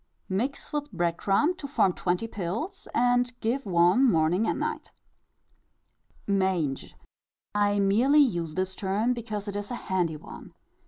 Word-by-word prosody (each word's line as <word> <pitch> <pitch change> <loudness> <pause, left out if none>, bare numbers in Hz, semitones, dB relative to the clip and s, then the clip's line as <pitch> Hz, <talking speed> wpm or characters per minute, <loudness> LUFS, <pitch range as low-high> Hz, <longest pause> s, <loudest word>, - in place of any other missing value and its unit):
iv. - - -21
Mix 260 +10 -3
with 295 -2 -3
bread 170 -3 0
crumb 250 - +2
to 285 - -6
form 265 -10 +2
twenty 180 +5 -1
pills, 225 - -5
and 245 0 +2
give 235 +2 -1
one 180 +6 +4
morning 180 -2 +3
and - - -1
night. - - -3 1.3
Mange. 190 -8 -1 0.6
I 205 0 +2
merely 220 +9 +3
use 170 - 0
this 185 0 -1
term 205 +6 0
because 215 -3 -5
it 200 - -4
is 205 0 -4
a 245 - -3
handy 180 -8 -1
one. - - -12
205 Hz, 150 wpm, -27 LUFS, 180-245 Hz, 1.3 s, one